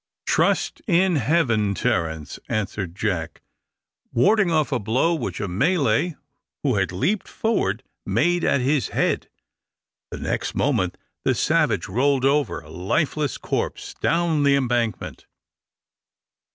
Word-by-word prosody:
"Trust - - +1
to 180 -3 +3
Heaven, 115 -7 +2
Terence," 80 -5 -2
answered 100 -4 -3
Jack, 95 -6 -3 0.7
warding 200 - +3
off 155 -3 +1
a 125 - +1
blow 120 +11 +1
which 155 -8 -3
a 105 - -2
Malay 140 - +1 0.5
who 130 -7 +1
had 95 -3 0
leaped 185 - -1
forward 125 - -1 0.2
made 170 - +1
at 140 - +2
his 135 -2 +1
head. - - -1 0.8
The - - -6
next - - -3
moment - - 0 0.3
the - - +2
savage - - +1
rolled 135 +6 +1
over, 140 - +1
a 75 -1 -15
lifeless 140 - -1
corpse, - - -3
down 165 -2 +2
the 140 -1 +4
embankment. 120 -4 -1
130 Hz, 125 wpm, -23 LUFS, 105-160 Hz, 0.8 s, the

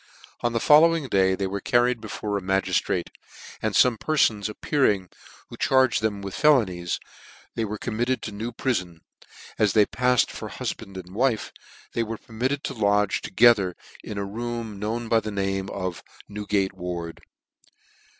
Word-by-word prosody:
On 120 - 0
the 115 - 0
following 160 +3 +5
day 95 -2 +3
they 95 - -2
were 100 +1 -3
carried 120 +1 +2
before 105 -1 -4
a 100 - -1
magistrate, 95 +1 0 0.5
and 110 -2 -1
fome 120 -4 +4
perfons 110 -9 +1
appearing 105 -5 +1 0.4
who - - -10
charged 130 -4 +3
them 105 -2 -1
with 100 -1 -5
felonies, 95 - +2 0.5
they 115 - -1
were 105 +1 -4
com 110 0 -5
mit 120 +1 +1
ted 130 0 -1
to 105 - -5
New 110 +4 -5
prifon, 120 -2 0
and 85 -2 -19 0.6
as 105 -2 +3
they 105 -2 +5
pafTed 125 +2 +2
for - - -7
hufband 95 -1 -6
and 90 0 -9
wife, 120 0 0 0.4
they 115 - 0
were 115 0 -3
permitted 130 +7 -3
to - - -3
lodge 105 -3 +1
together 100 -4 +4 0.3
in 105 - -6
a 100 - -2
room 115 0 -5
known 115 +3 -3
by 115 0 +4
the 110 - -5
name 95 -1 -2
of 95 -3 -4 0.3
New 105 0 -7
gate 100 -1 +1
Ward. 85 -2 -6
105 Hz, 170 wpm, -25 LUFS, 95-120 Hz, 0.6 s, following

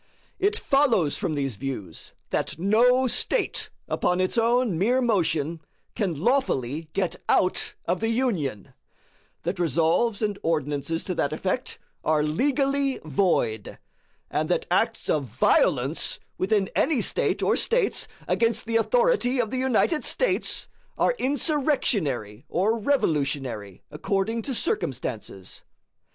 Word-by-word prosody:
It 415 +2 +2
follows 270 - +2
from 175 -7 -2
these 135 -6 -2
views 115 -10 -6 0.2
that - - -1
no 240 +8 +4
State 260 - 0 0.2
upon 180 +1 0
its 185 0 +1
own 235 -3 +2
mere 240 +7 +3
motion 170 - 0 0.3
can 180 -9 -2
lawfully 160 - 0
get 190 -3 -1
out 185 - +2
of 175 +1 0
the 225 - 0
Union; 180 - -1 0.7
that 175 +2 -3
Resolves 170 - +1
and 205 -2 -1
Ordinances 155 0 -1
to 185 - -2
that 145 -4 -1
effect 185 +10 -2 0.3
are 155 -1 +2
legally 275 - +1
void; 145 - 0 0.5
and - - -1
that - - +1
acts - - +1
of 145 -3 +1
violence, 130 - +1 0.2
within 195 0 +1
any 310 -6 +2
State - - 0
or - - +3
States, - - +1 0.2
against 230 0 +1
the 230 0 +1
authority 445 - +2
of 225 -3 0
the 260 - -1
United 265 +5 +2
States, - - 0 0.3
are - - +3
insurrectionary 250 - 0
or 215 +6 +1
revolutionary, 140 - -1
according 195 +8 -1
to 265 +2 -4
circumstances. 115 - -3
190 Hz, 125 wpm, -25 LUFS, 150-250 Hz, 0.7 s, no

